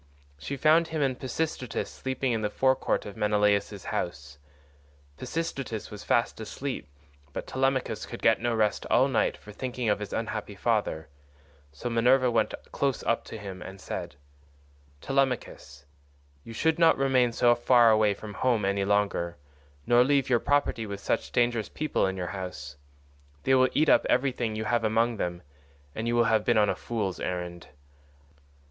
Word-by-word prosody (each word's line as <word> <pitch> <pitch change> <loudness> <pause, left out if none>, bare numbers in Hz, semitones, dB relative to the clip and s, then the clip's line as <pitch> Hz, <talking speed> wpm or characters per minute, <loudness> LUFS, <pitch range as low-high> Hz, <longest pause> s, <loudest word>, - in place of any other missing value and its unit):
She 140 - -5
found 160 +4 +4
him 160 -2 -1
and 130 -2 -1
Pisistratus 130 -3 -3
sleeping 130 -1 -2
in 115 -2 0
the 105 - 0
forecourt 130 +4 +1
of 100 - -8
Menelaus's 105 -2 +1
house; 75 -4 -4 0.8
Pisistratus 135 -6 -4
was 105 -1 -8
fast 120 - +1
asleep, 130 +5 -5 0.5
but - - -5
Telemachus 130 -4 -1
could 120 - -9
get 115 - +4
no 120 -1 0
rest 105 -2 0
all 130 +3 +4
night 130 - +1
for 105 - -13
thinking 125 +1 -3
of 105 - +1
his 105 - -6
unhappy - - -4
father, 80 0 -1 0.6
so 70 - -6
Minerva 125 +2 +3
went 115 -2 +1 0.2
close 140 -2 -1
up 115 - 0
to - - -8
him 95 -3 -8
and 95 +1 -9
said: 70 - -6 0.9
"Telemachus, 125 - -2 0.6
you - - -10
should 160 +8 0
not 165 -1 +5
remain 130 -3 +3
so 120 +1 +4
far 120 -1 +5
away 110 -2 +3
from 105 +1 -9
home 115 -1 +1
any 100 0 +1
longer, 100 -4 0 0.5
nor 120 0 +5
leave 135 0 +1
your 120 - +4
property 115 -6 0
with 100 -1 -5
such - - -2
dangerous 120 -2 +1
people 155 -9 0
in 95 0 -3
your 90 -1 -3
house; 90 -7 -6 0.7
they 135 - +2
will 130 -1 +5
eat 155 +2 +3
up - - +4
everything 125 -5 +1
you 110 0 -3
have 120 0 +1
among 115 +1 +1
them, 90 -2 -3 0.5
and 110 +1 -4
you 120 - +1
will 120 - +4
have 110 -2 +2
been 120 0 +2
on 105 -1 +4
a - - 0
fool's 105 -6 -3
errand. 90 -1 -4
115 Hz, 165 wpm, -27 LUFS, 100-130 Hz, 0.9 s, not